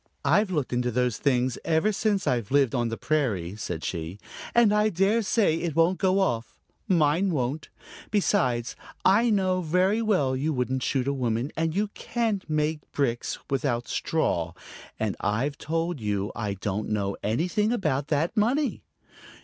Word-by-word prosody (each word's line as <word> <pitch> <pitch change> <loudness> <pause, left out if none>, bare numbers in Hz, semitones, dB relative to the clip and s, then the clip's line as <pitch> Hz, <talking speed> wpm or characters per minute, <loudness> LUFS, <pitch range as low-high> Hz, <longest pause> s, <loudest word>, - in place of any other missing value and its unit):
"I've 210 -1 +3
looked 150 -8 -1
into 125 0 +1
those 125 -1 0
things 130 -3 +1
ever 165 +6 +2
since 205 -2 0
I've 120 -7 0
lived 140 -2 +3
on 120 -3 0
the 115 - -4
prairie," 105 - -1
said 90 -6 -5
she. 85 +2 -4 0.4
"And 235 -3 +5
I 210 +1 +3
dare 200 +4 +2
say 210 -4 +2
it 165 -3 -3
won't 165 +3 +3
go 190 -1 +2
off 120 -11 -1 0.3
mine 170 +2 +3
won't. 140 -1 -2 0.4
Besides, 150 - +1 0.3
I 220 +5 +5
know 185 -3 +2
very 180 +6 +2
well 180 -13 +1
you 150 +4 -1
wouldn't 130 0 -1
shoot 130 0 0
a 140 - +1
woman, 125 0 -1
and 160 0 -1
you 205 +1 0
can't 215 -4 -2
make 155 0 -1
bricks 120 -5 -1
without 125 -3 -1
straw; 85 - -1 0.5
and 110 -3 0
then - - -15
I've 125 +8 -1
told 165 0 -2
you 105 -2 -2
I 105 -4 -2
don't 100 +2 -3
know 100 -2 -1
anything 180 - 0
about 145 - 0
that 155 +6 0
money." 250 +7 +1
150 Hz, 165 wpm, -26 LUFS, 120-190 Hz, 0.5 s, And